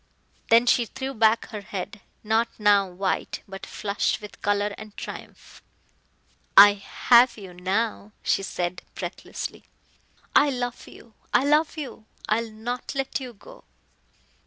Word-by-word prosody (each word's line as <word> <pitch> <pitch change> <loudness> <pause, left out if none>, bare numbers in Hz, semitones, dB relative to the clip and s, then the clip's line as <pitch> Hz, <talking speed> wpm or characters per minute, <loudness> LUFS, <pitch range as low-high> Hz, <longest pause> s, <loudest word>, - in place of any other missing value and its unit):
Then 230 +1 +6
she 240 -1 +3
threw 265 +2 -5
back 220 -1 +3
her 215 -3 -6
head, 200 +1 -6 0.2
not 220 +2 +2
now 205 -2 +4
white, 185 +2 -2
but 195 0 -8
flushed 200 -1 -1
with 210 -1 -12
color 205 0 +1
and 215 -1 -12
triumph. - - -9 1.0
"I 205 +1 +11
have 235 +5 +4
you 190 -4 -10
now," 200 +4 -2
she - - +2
said 180 -2 -3
breathlessly. - - -6 0.7
"I 290 - +6
love 245 -2 -4
you 230 - -15 0.2
I - - +5
love 300 +3 +2
you 245 -7 -7 0.2
I 215 +2 +2
will 230 - -7
not 235 +5 -5
let 270 0 -2
you 255 -2 -8
go!" - - -15
220 Hz, 140 wpm, -25 LUFS, 200-245 Hz, 1.0 s, I